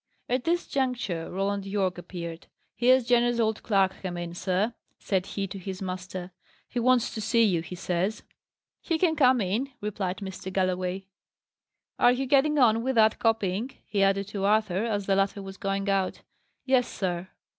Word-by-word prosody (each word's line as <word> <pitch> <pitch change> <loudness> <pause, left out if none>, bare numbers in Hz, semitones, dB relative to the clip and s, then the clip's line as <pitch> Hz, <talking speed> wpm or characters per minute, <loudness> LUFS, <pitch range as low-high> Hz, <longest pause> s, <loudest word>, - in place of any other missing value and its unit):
At 250 0 -1
this 345 +1 +1
juncture, 245 -11 -1
Roland 195 +1 -1
Yorke 195 -2 -1
appeared. 170 -2 -7 0.3
"Here's 250 +2 +4
Jenner's 240 0 +3
old 220 -1 +1
clerk 195 -3 +2
come 180 -2 -4
in, 175 -1 -5
sir," 190 +5 0 0.2
said 190 -1 -1
he 200 - -3
to 195 +1 -7
his 190 0 -6
master. 185 -1 -5 0.4
"He 245 - -3
wants 245 0 +3
to 220 - -4
see 230 +2 +3
you, 180 -6 +2
he 175 +2 -8
says." 185 +4 -2 0.6
"He 330 - 0
can 320 -1 +2
come 260 -4 +5
in," 215 +7 -1
replied 200 -3 -3
Mr. 190 -1 -6
Galloway. 185 0 -1 0.9
"Are 245 - +6
you 255 +2 0
getting 285 +3 +3
on 230 -4 +5
with 260 +2 -1
that 220 -1 +4
copying?" 225 -1 +1 0.2
he 200 - -1
added 195 0 +2
to 200 -1 -4
Arthur, 210 -1 +2
as 205 -3 -1
the 195 - +2
latter 195 +1 0
was 195 0 -9
going 195 -1 -2
out. 195 -2 0 0.4
"Yes, 260 -2 +3
sir." 180 -1 -3
200 Hz, 175 wpm, -27 LUFS, 185-235 Hz, 0.9 s, Are